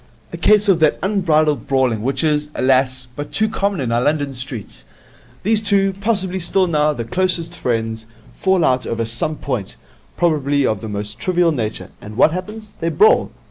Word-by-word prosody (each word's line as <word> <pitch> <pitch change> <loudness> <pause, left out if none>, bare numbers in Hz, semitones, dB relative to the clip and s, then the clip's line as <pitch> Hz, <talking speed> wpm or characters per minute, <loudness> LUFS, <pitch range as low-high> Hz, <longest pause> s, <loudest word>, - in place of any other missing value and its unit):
'A - - -4
case 210 0 +4
of 190 -4 +4
that 155 -2 +3
unbridled 160 -7 +1
brawling 130 -5 +1
which 135 +4 -1
is, 150 -1 +1
alas, 130 0 +1
but 145 0 -6
too 220 - +1
common 200 -3 -1
in 125 -4 -2
our 120 +1 +2
London 145 0 0
streets. 130 -4 -6 0.6
These 220 +1 +2
two, 200 -2 +2
possibly 195 -2 -1
till 185 +2 +2
now 150 -3 +2
the 120 -6 -4
closest 175 +3 -1
friends, 115 -3 -2 0.3
fall 190 -3 +1
out 130 0 +1
over 115 0 -2
some 120 +7 -3
point, 125 -10 -4 0.4
probably 145 -4 +1
of 110 -4 -1
the 110 - -6
most 105 0 -5
trivial 175 -2 +2
nature, 115 -7 -4
and 105 +1 -10
what - - +5
happens? 210 +5 -7
They 165 - -1
brawl. 435 - +4
150 Hz, 180 wpm, -19 LUFS, 125-185 Hz, 0.6 s, what